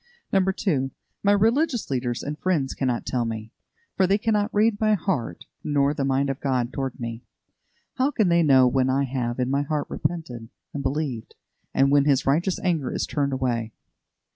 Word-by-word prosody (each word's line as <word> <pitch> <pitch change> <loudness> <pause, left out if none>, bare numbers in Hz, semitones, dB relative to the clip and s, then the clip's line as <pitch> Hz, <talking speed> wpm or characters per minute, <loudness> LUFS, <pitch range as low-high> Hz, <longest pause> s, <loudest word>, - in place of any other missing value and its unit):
2. 190 -7 +1 0.3
My 200 - +3
religious 230 +5 +2
teachers 125 -3 -2
and 150 +1 -5
friends 160 -8 0
cannot 125 -3 -1
tell 125 -2 0
me, 110 -1 -5 0.4
for 190 - +3
they 195 +2 +3
cannot 210 -1 0
read 210 0 +2
my 215 -1 +4
heart, 175 - -3 0.2
nor 145 -1 +2
the 140 - -2
mind 135 +1 +1
of 135 - -6
God 130 -3 -1
toward 135 -1 -4
me. 115 -1 -5 0.8
How 265 +2 +3
can 220 -9 +1
they 170 0 +4
know 135 -5 +6
when 130 +1 +2
I 135 +2 +2
have 125 -2 -2
in 125 +1 0
my 140 +1 +2
heart 150 0 -2
repented 125 -10 -4 0.2
and 145 - -3
believed, 135 -4 -3 0.4
and 135 +1 +3
when 140 -1 +4
His 140 -3 +2
righteous 170 +7 +1
anger 165 -8 0
is - - -1
turned 140 -2 -1
away? 120 -4 -1
140 Hz, 180 wpm, -24 LUFS, 130-185 Hz, 0.8 s, know